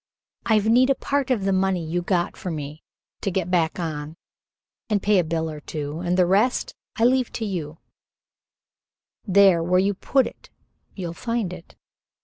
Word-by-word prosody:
I've 215 -2 +3
need 250 +4 +5
of 275 - +1
part 280 -1 -1
of 225 -7 0
the 195 - +2
money 185 -2 +1
you 175 +3 -1
got 175 -1 0
for 185 - -6
me 150 -1 -6 0.4
to - - -1
get 180 -1 -2
back 170 -1 +1
on 155 -1 -4 0.7
and 210 -2 +2
pay 205 0 +3
a - - +2
bill 160 0 -2
or 155 -1 -6
two 150 0 -5
and 180 +1 -1
the 180 - +5
rest 205 +8 +1 0.2
I 225 - 0
leave 255 0 +3
to 225 - -3
you 165 -6 -4 1.5
there 190 -3 +5
where 180 +2 +2
you 200 +2 +2
put 260 +7 +1
it - - -10 0.5
you'll 175 -4 -5
find 230 -2 -2
it. 180 -2 -12
185 Hz, 175 wpm, -23 LUFS, 165-210 Hz, 1.5 s, need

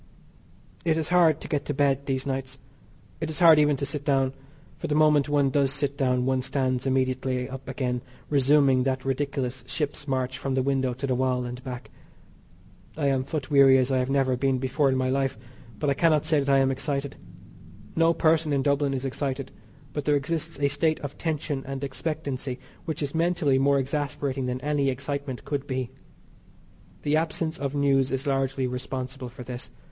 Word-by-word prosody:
It 160 -2 +2
is 160 0 -1
hard 170 -4 +4
to - - -7
get 145 -2 -1
to 145 - -2
bed 140 -1 +1
these 130 -1 -1
nights. 135 -1 -3 0.6
It 160 - -3
is 155 - -4
hard 165 -4 +7
even 150 -1 +3
to 140 - -2
sit 145 0 -4
down, 135 -2 +2 0.4
for - - -5
the 150 - 0
moment 150 -2 +4
one 145 -2 +2
does 140 -1 +2
sit 140 0 -1
down 125 -2 +1
one 130 0 +1
stands 130 -1 -1
immediately 130 -1 0
up 135 0 -8
again 125 -2 -2 0.3
resuming 140 -2 +4
that 130 0 -1
ridiculous 135 -2 -2
ship's 145 +1 -3
march 130 -1 -1
from 135 -1 -2
the 130 - +2
window 130 -2 0
to 135 +3 -4
the 130 - 0
wall 125 0 0
and 125 +1 -7
back. 125 -1 -7 1.1
I 145 -3 +1
am 135 -1 +1
foot 150 +1 -4
weary 135 -2 +7
as 130 +1 +1
I 130 - +2
have 125 +1 -1
never 135 -2 +2
been 135 +1 +1
before 135 +2 +1
in 130 - +1
my 130 0 +1
life, 135 -2 0 0.4
but 140 +6 0
I - - +4
cannot 155 0 +3
say 155 -1 +3
that 140 0 -1
I 135 - +5
am 135 0 +3
excited. 140 +1 -3 0.8
No 165 0 +4
person 160 -1 +2
in 140 -2 +1
Dublin 140 -1 +1
is 130 +1 -3
excited, 135 0 -3 0.4
but 150 -2 -3
there 150 - +3
exists 145 0 -2
a 140 - +3
state 155 +3 +1
of 145 -1 -6
tension 150 -4 -2
and 135 0 -4
expectancy 140 -1 -3 0.3
which 160 -2 -3
is 140 - -3
mentally 165 -5 +2
more 140 +1 +3
exasperating 140 -1 -2
than 125 +1 -3
any 145 -2 +1
excitement 140 0 -4
could 145 -1 -3
be. 130 -3 -3 1.1
The 150 +1 +2
absence 160 0 -1
of 140 0 -3
news 135 -2 +2
is 135 +2 -2
largely 135 -1 0
responsible 125 +1 -4
for 125 +1 -10
this. 120 0 -7
135 Hz, 195 wpm, -26 LUFS, 130-145 Hz, 1.1 s, hard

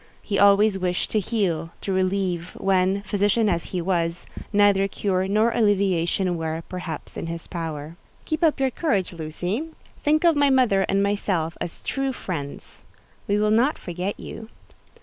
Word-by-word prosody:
He 200 - -1
always 200 0 +5
wished 180 -1 -1
to 215 - +2
heal—to 190 -4 -2
relieve—when, 185 +1 0
physician 205 +2 +2
as 170 -4 0
he 180 -2 -3
was, 170 -2 -1 0.3
neither 205 -2 +4
cure 190 -1 -1
nor 215 +4 +3
alleviation 190 -4 +1
were, 160 0 -3
perhaps, 180 -4 -6
in - - -4
his 165 0 -5
power. 160 -2 -5 0.3
"Keep 310 +1 -2
up 310 -3 +3
your 265 -1 +2
courage, 205 - 0
Lucy. 175 - -3 0.3
Think 305 +2 +2
of 335 -2 +5
my 285 -1 +4
mother 245 -8 +3
and 195 0 +2
myself 190 -5 0
as 170 - -5
true 270 -1 -1
friends. 145 - -6 0.4
We 205 - +2
will 210 0 +2
not 245 +7 +3
forget 180 +3 -4
you." 220 - -8
195 Hz, 150 wpm, -24 LUFS, 175-215 Hz, 0.4 s, always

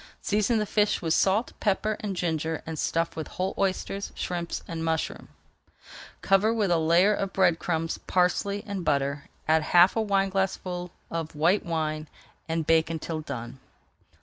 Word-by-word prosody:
Season 215 +3 +1
the 210 - +1
fish 210 0 +1
with 160 -2 0
salt, 200 +7 +2
pepper, 215 +1 +1
and 200 -3 -3
ginger, 160 -2 -2
and 160 -1 -5
stuff 165 0 0
with 160 - -4
whole 185 +1 -3
oysters, 195 +1 -1
shrimps, 175 -1 -3
and 165 -1 -4
mushrooms. 160 0 -2 0.9
Cover 195 +3 +4
with 210 -5 +1
a 170 - +3
layer 170 +6 +4
of 195 -1 -2
bread 175 -4 +3
crumbs, 165 -1 -2
parsley, 200 +3 +1
and 200 -4 -4
butter, 140 -1 0 0.2
add 160 0 +4
half 175 +4 +5
a 225 - +2
wineglassful 195 -3 -1 0.2
of 165 -2 -4
white 170 +7 +3
wine, 155 -2 -2 0.4
and 165 -1 -1
bake 160 0 +3
until 160 -1 -4
done. 130 -3 -7
175 Hz, 155 wpm, -27 LUFS, 160-195 Hz, 0.9 s, half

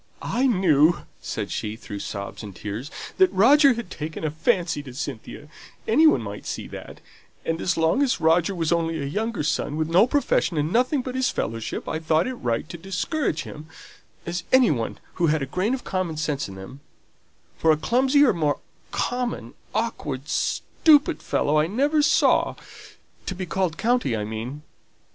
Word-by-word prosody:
"I 255 +3 +1
knew," 175 - +4 0.2
said - - -4
she 105 +1 -3
through 105 -2 -8
sobs 100 0 -6
and 100 -4 -9
tears, 110 +7 -6 0.3
"that 375 -1 +5
Roger 275 +6 +6
had 230 -6 -7
taken 155 +1 -6
a 155 - 0
fancy 165 0 0
to 130 -3 -11
Cynthia; 140 +1 -6 0.4
any 285 +9 +5
one 305 - +3
might 100 -1 -7
see - - -4
that; - - -10 0.4
and 165 0 -1
as 175 - 0
long 165 +11 +2
as 275 -4 +1
Roger 170 +4 +3
was 165 -2 -1
only 165 -1 0
a 140 - -3
younger 215 +6 -2
son, 150 0 -1
with 155 -1 0
no 185 +7 +5
profession, 250 - +1
and 150 +3 0
nothing 255 +3 +2
but 255 - -5
his 260 0 +1
fellowship, 115 0 -4
I 160 - -2
thought 160 0 +2
it 255 - -3
right 120 - -2
to 170 - -8
discourage 195 - -2
him, 150 +1 -10 0.6
as 170 0 -3
any 260 -6 +6
one 115 -6 -1
would - - -20 0.2
who 170 - +4
had 155 -2 +1
a - - -1
grain 185 - 0
of 260 - -9
common 185 -4 -2
sense 150 -6 -2
in 95 - -9
them; 95 +8 -10 0.8
for 160 - +4
a 155 - +3
clumsier, 265 - +3
more 150 -4 0 0.3
common, 240 - -2 0.2
awkward, 150 - -3
stupid 310 - +2
fellow 150 +1 +1
I 155 - +2
never 285 - +2
saw 290 - +3 0.7
to 190 - -3
be 185 0 -4
called 180 -2 -1
'county,' 230 - +1
I 105 - -2
mean." 115 +7 -6
165 Hz, 180 wpm, -24 LUFS, 145-235 Hz, 0.8 s, Roger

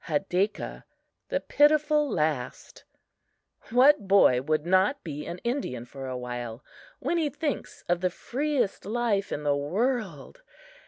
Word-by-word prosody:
Hadakah, 195 +1 -1 0.5
"The - - 0
Pitiful 300 0 +3
Last" 150 - -3 0.8
WHAT 250 -2 +5
boy 190 -11 +5
would 155 +2 0
not 190 +10 +2
be 150 -3 -6
an 170 - -5
Indian 235 - -2
for 135 +2 -8
a 130 -1 -4
while 120 -1 -6 0.3
when 345 - -1
he 310 -3 +1
thinks 290 0 -4
of 175 0 +1
the 185 - +2
freest 265 - -2
life 210 -2 -1
in 150 - -3
the 145 -1 +2
world? 205 - -2
195 Hz, 130 wpm, -27 LUFS, -, 0.8 s, WHAT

